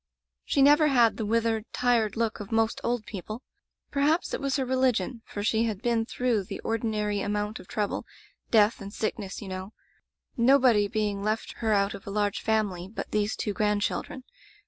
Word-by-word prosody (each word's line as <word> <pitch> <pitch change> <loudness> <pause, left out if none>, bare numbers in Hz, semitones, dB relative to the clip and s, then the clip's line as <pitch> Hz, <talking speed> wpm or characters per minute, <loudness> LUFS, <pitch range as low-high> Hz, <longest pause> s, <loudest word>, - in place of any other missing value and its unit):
"She 275 - +2
never 295 +2 +6
had 240 -5 +4
the 220 - -2
withered, 225 0 +1
tired 235 -4 +2
look 230 -1 -1
of 205 +1 -8
most 225 0 +1
old 235 -2 -1
people. 215 +5 -7 0.5
Perhaps 295 +5 +1
it - - -2
was 275 -1 0
her 265 -1 0
re 260 +1 0
ligion, 245 -3 +1
for 205 - -5
she 220 +1 +2
had 215 -2 -3
been 230 -2 +1
through 240 -7 0
the - - -6
ordi 225 +1 -1
nary 210 -2 -1
amount 210 +1 -2
of - - -13
trouble 210 -2 -2 0.2
— - - -42
death 215 0 +4
and 200 0 -7
sickness, 210 -1 -4
you - - -8
know 190 +2 -6 0.4
— - - -63 0.2
nobody 250 -4 +5
being 210 -2 -1
left 215 +2 -2
her 225 -2 0
out 200 0 +2
of 200 - -10
a - - -3
large 205 0 0
family 205 -5 0
but 220 - -7
these 210 0 0
two 210 - -2
grandchildren. 210 +6 -1
220 Hz, 195 wpm, -27 LUFS, 205-235 Hz, 0.5 s, never